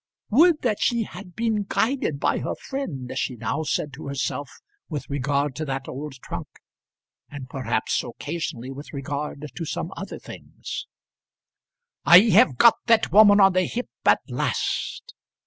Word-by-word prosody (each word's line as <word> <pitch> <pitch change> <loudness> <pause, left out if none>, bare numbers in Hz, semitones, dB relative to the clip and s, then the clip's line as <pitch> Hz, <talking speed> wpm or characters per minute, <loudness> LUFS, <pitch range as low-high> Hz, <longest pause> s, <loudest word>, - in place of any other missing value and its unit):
"Would 315 +7 +5
that 220 -5 +1
she 235 -2 +2
had 190 -4 -11
been 225 -2 0
guided 225 - 0
by - - +1
her - - -3
friend!" 155 - -5
she 130 -1 -2
now 140 +6 -2
said 150 -2 -2
to 140 +2 -9
herself 140 0 -3 0.4
with 150 -4 -5
regard 140 0 0
to 155 - -3
that 135 -2 -4
old 145 +2 -6
trunk, - - -6 0.8
and 140 -3 -8
perhaps 130 0 -1
occasionally 145 -6 -5
with 140 +3 -10
regard 145 +1 -4
to 170 - -5
some 165 +3 -4
other 195 - -6
things. - - -8 1.2
"I 190 +6 +8
have 130 -5 +5
got 235 - +7
that 230 -1 +4
woman 205 0 +7
on 195 -1 +6
the 185 0 +2
hip 245 +6 -4 0.2
at - - +5
last!" - - -2
155 Hz, 150 wpm, -24 LUFS, 140-215 Hz, 1.2 s, I